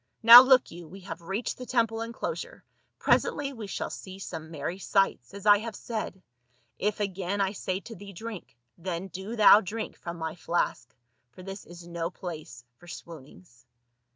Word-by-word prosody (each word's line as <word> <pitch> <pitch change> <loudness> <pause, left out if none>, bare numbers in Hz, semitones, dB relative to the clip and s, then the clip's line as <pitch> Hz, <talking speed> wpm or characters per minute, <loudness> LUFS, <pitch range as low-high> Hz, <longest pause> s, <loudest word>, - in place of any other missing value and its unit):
Now 235 +2 +13
look 260 -1 +4
you, 170 0 -10
we 190 +5 -12
have 185 -1 -8
reached 195 +10 -4
the 250 - -6
temple 225 -2 +1
enclosure, 470 - -5 0.3
pre - - +3
sently 280 -1 0
we 225 -5 -7
shall - - -4
see 190 0 -8
some 160 -4 -7
merry 165 +4 -5
sights, 195 -11 +1
as 200 0 -10
I 205 -1 +7
have 225 0 -6
said; 215 -5 -5 0.6
if 210 +1 -1
again 195 -1 -2
I 195 -1 +1
say 190 -1 -3
to 230 - -10
thee, 200 +1 -10
drink, 200 - -9 0.2
then 180 +1 -4
do 190 +6 -6
thou 215 -1 +8
drink 220 +3 -5
from 170 0 -7
my 160 -1 -4
flask, 165 -7 -2 0.3
for 125 +10 -14
this 195 +1 -8
is 175 0 -12
no 170 -1 -3
place 160 -9 -8
for 175 - -17
swoonings." 150 -6 -12
190 Hz, 180 wpm, -28 LUFS, 170-215 Hz, 0.6 s, Now